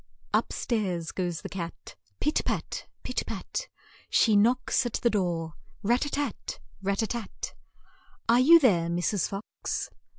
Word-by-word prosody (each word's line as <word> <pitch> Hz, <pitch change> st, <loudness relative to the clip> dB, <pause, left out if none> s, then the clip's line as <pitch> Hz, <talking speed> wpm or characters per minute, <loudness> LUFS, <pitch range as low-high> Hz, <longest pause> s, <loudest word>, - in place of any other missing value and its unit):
Up -, -, +2 dB
stairs 185 Hz, -8 st, -1 dB
goes 175 Hz, -3 st, -2 dB
the -, -, -3 dB
cat, 170 Hz, -3 st, -6 dB, 0.2 s
pit 300 Hz, -, +2 dB
pat! -, -, -2 dB, 0.2 s
pit -, -, -1 dB
pat! -, -, -4 dB, 0.4 s
She 220 Hz, -3 st, +4 dB
knocks 245 Hz, +5 st, +3 dB
at 240 Hz, -2 st, -3 dB
the 235 Hz, -, +2 dB
door, 170 Hz, -5 st, 0 dB, 0.3 s
rat 240 Hz, +5 st, +3 dB
tat 290 Hz, -, -2 dB, 0.3 s
tat! -, -, -5 dB, 0.2 s
rat 195 Hz, 0 st, 0 dB
tat 220 Hz, -, 0 dB
tat! 235 Hz, -4 st, -5 dB, 0.7 s
"Are 235 Hz, +1 st, +6 dB
you 320 Hz, +7 st, +9 dB
there, 185 Hz, -, +4 dB
Mrs. 175 Hz, +2 st, +1 dB
Fox?' 195 Hz, +2 st, -4 dB
205 Hz, 145 wpm, -28 LUFS, 175-240 Hz, 0.7 s, you